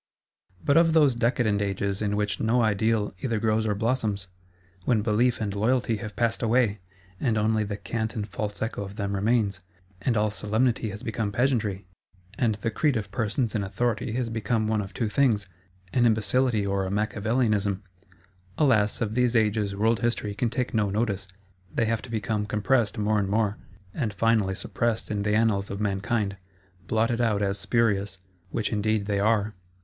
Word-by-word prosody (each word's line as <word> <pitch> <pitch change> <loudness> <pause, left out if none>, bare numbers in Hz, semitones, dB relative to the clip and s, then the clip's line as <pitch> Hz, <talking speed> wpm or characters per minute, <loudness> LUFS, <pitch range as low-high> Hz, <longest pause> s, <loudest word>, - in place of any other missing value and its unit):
But 145 - +4
of 165 -1 +5
those 150 -5 +5
decadent 115 -3 +1
ages 100 0 -1
in 105 -1 0
which 105 -1 -1
no 115 +2 +2
Ideal 110 0 +1
either 115 -4 -1
grows 110 0 +1
or 105 - +1
blossoms? 110 -4 -1 0.5
When 110 0 +2
Belief 120 +3 +2
and 105 -3 -2
Loyalty 115 +2 +1
have 105 0 -7
passed 115 -1 0
away, 115 -3 +2 0.4
and 115 -5 +1
only 110 0 +2
the 105 -1 -4
cant 110 +3 -3
and 105 -2 -3
false 105 +2 -4
echo 110 -2 -3
of 100 0 -8
them 100 -2 -2
remains; 100 -1 +1 0.4
and 120 0 +1
all 105 0 +2
Solemnity 110 +3 0
has 105 +1 -8
become 110 -2 -2
Pageantry; 110 -5 0 0.5
and 110 0 +1
the 110 +2 -3
Creed 145 +2 +1
of 100 -2 -5
persons 110 +1 0
in 105 -3 0
authority 110 +3 -1
has 120 -1 -1
become 110 0 0
one 110 -1 +1
of 100 -1 -7
two 110 +4 -2
things: 110 -3 +2 0.5
an 120 -2 +4
Imbecility 110 0 +2
or 100 -1 0
a - - -3
Macchiavelism? 105 -1 0 0.7
Alas, 115 -9 +3
of 110 -2 -1
these 125 0 +2
ages 105 -2 +1
World 110 +2 +2
History 115 -3 -1
can 115 +3 0
take 125 +1 -2
no 105 -3 +2
notice; 100 -2 -1 0.4
they 115 - +1
have 115 0 0
to - - -11
become 105 -1 -2
compressed 105 +1 +1
more 105 0 +1
and 100 -1 -1
more, 105 0 0 0.3
and 110 -8 -2
finally 105 -2 +2
suppressed 115 +2 -2
in 105 -1 -1
the 105 +1 +1
Annals 110 -3 +2
of 100 - -5
Mankind; 100 0 -1 0.5
blotted 115 +2 +1
out 105 -3 +1
as 100 0 -1
spurious,—which 100 -2 -1
indeed 105 0 +1
they 100 -1 0
are. 105 0 +2
110 Hz, 175 wpm, -26 LUFS, 100-115 Hz, 0.7 s, of